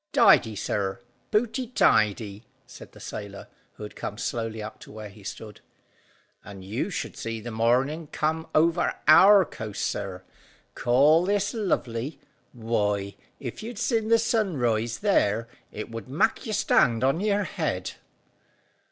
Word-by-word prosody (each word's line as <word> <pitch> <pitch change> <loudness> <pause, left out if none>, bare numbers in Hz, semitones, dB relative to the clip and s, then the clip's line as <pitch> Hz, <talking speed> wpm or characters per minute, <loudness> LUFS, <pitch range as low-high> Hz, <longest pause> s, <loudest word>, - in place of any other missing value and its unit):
"Tidy, 110 -1 +5
sir, 100 +1 -2 0.3
pooty 235 +3 0
tidy," 105 - +2 0.2
said - - -13
the - - -14
sailor, 100 -1 -8 0.3
who - - -11
had 105 - -8
come 105 - -5
slowly 115 -1 -3
up 110 +1 -7
to - - -13
where 110 -1 -8
he 100 +1 -16
stood. 105 +2 -8 0.8
"And 100 -3 -11
you 115 - -2
should 180 -5 -5
see 115 -1 -5
the 120 +2 -7
morning 130 +8 +1
come 160 +2 -2
over 170 +2 +2
our 190 +5 +8
coast, 110 -7 -5
sir. 95 -2 -4 0.5
Call 145 +7 +4
this 205 +1 0
lovely? 145 - -2 0.3
Why, 105 -4 -1 0.3
if 125 -4 -6
you'd 230 +1 -7
sin 225 -1 0
the 230 +1 +5
sun 220 -6 0
rise 115 -1 0
there, 115 - +2 0.2
it 105 +2 -7
would 115 0 -7
mak' 150 - 0
you 215 - -2
stand 120 - +3
on 135 +5 +2
your 205 0 +1
head." - - -3
120 Hz, 145 wpm, -26 LUFS, 110-180 Hz, 0.8 s, our